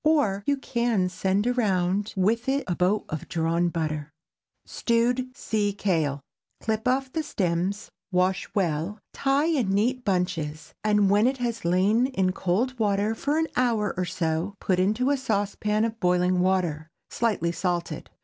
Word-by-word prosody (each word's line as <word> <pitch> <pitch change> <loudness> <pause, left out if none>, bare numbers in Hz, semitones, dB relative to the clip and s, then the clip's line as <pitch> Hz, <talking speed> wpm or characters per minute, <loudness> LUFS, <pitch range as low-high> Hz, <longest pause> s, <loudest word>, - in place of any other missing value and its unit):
Or, 260 -11 +2
you 285 0 +2
can 235 -8 0
send 190 +3 0
around 205 -5 0
with 230 +7 +1
it 275 +1 +1
a 180 - 0
boat 190 +5 +1
of 155 - -5
drawn 170 +1 +1
butter. 155 -3 -3 0.6
STEWED 250 +2 0
SEA 205 -2 0
KALE. 160 -8 0 0.4
Clip 220 +1 -2
off 260 +1 0
the 320 - 0
stems, 190 - -2 0.2
wash 185 +1 +1
well, 175 +1 0 0.2
tie 275 +2 +1
in 285 -11 +1
neat 245 +6 +1
bunches, 165 -6 -2
and 210 -2 +3
when 210 +3 +4
it 265 +1 0
has 235 -2 -3
lain 200 +8 +3
in 190 -9 0
cold 225 +8 -1
water 205 +1 +1
an 315 +3 +2
hour 230 -5 +1
or 185 - -1
so, 170 +1 -2
put 185 -2 +1
into 215 +8 +2
a 285 - +2
saucepan 210 -2 0
of 225 0 -4
boiling 180 0 +2
water, 180 -4 0 0.2
slightly 210 -8 0
salted. 170 -2 -3
200 Hz, 150 wpm, -26 LUFS, 180-235 Hz, 0.6 s, when